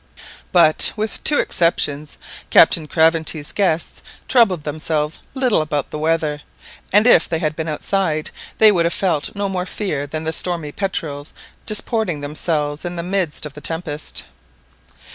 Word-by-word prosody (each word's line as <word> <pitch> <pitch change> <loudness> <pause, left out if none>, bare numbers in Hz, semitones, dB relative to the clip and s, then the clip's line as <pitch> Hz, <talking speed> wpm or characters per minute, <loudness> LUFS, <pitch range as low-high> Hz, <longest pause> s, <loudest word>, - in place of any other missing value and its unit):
But, 165 -3 +4
with 215 0 -4
two 295 - +5
exceptions, 150 -4 0 0.3
Captain 155 -2 +5
Craventy's 160 -1 +1
guests 175 -5 -1 0.3
troubled 200 - +3
themselves 150 0 -2 0.2
little 255 -10 +2
about 150 -2 -3
the 150 - -5
weather, 155 -2 -1 0.5
and 210 +3 +5
if 240 -9 +5
they 165 - 0
had 155 -2 -2
been 160 0 -4
outside 155 0 -1 0.3
they 220 -1 +7
would 170 -4 +1
have 170 - -1
felt 170 -5 -1
no 200 0 -1
more 185 -1 -3
fear 150 -10 -3
than 155 +2 -5
the 160 0 -2
stormy 165 -4 -2
petrels 155 -6 -4 0.3
disporting 215 -5 +1
themselves 150 0 -2
in 175 0 -4
the 170 - -4
midst 180 -5 -1
of 150 - -8
the 150 - -11
tempest. 160 -1 -3
160 Hz, 150 wpm, -19 LUFS, 150-185 Hz, 0.5 s, they